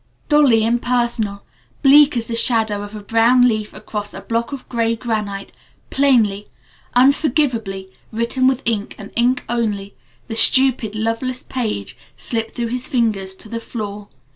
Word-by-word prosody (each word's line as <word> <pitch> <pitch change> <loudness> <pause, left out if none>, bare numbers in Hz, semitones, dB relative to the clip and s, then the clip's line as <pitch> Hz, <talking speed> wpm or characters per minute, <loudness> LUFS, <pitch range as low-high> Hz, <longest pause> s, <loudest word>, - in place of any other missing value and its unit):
Dully 280 -7 +5
impersonal, 235 -3 0 0.4
bleak 285 -1 +6
as 230 - -1
the 230 - -3
shadow 225 -3 +2
of 205 +1 -8
a 210 - -8
brown 235 +4 +4
leaf 215 -3 -1
across 210 -1 -6
a - - -7
block 230 +2 -2
of 275 -2 -7
gray 230 -1 0
granite, 210 -4 -4 0.4
plainly 225 -8 +2 0.5
unforgivably 245 -7 +2 0.2
written 235 +3 0
with 265 0 +1
ink 220 -2 -2
and 205 -1 -10
ink 245 +2 +2
only, 210 -4 -2 0.3
the 225 - -5
stupid, 245 -2 +3
loveless 230 +4 -2
page 210 - -4 0.2
slipped 225 - -3
through 235 -1 -2
his 250 +1 -3
fingers 215 -8 0
to 215 - -10
the 230 +1 -4
floor. 210 -3 -6
230 Hz, 145 wpm, -19 LUFS, 210-250 Hz, 0.5 s, bleak